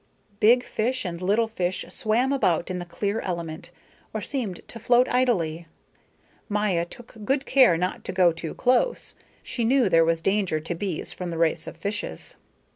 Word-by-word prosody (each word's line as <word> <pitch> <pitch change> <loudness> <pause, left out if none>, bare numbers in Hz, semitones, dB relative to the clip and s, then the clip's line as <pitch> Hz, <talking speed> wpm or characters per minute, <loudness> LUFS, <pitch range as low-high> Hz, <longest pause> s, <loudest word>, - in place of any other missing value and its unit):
Big 245 +3 +5
fish 250 +2 -1
and 170 -1 -4
little 210 +5 +2
fish 185 -4 -2
swam 240 +5 +1
about 180 - +1
in 180 - -3
the 175 - -5
clear 200 +5 -2
element, 170 -4 -5 0.5
or - - 0
seemed 225 -10 -4
to 230 - -8
float 245 +2 +4
idly. 175 -11 0 0.8
Maya 205 -5 +1
took 235 +6 -13
good 270 +5 0
care 255 -11 +5
not 180 +2 -2
to - - -3
go 185 -2 +4
too 165 -1 -6
close; 255 - +1 0.3
she 240 - -3
knew 245 -2 +3
there 165 -2 +5
was 165 0 0
danger 195 -5 +1
to 160 +3 -4
bees 175 -1 -3
from 180 -1 -5
the 165 - -4
race 165 -1 +1
of - - -8
fishes. 205 +5 -5
195 Hz, 175 wpm, -25 LUFS, 170-235 Hz, 0.8 s, Big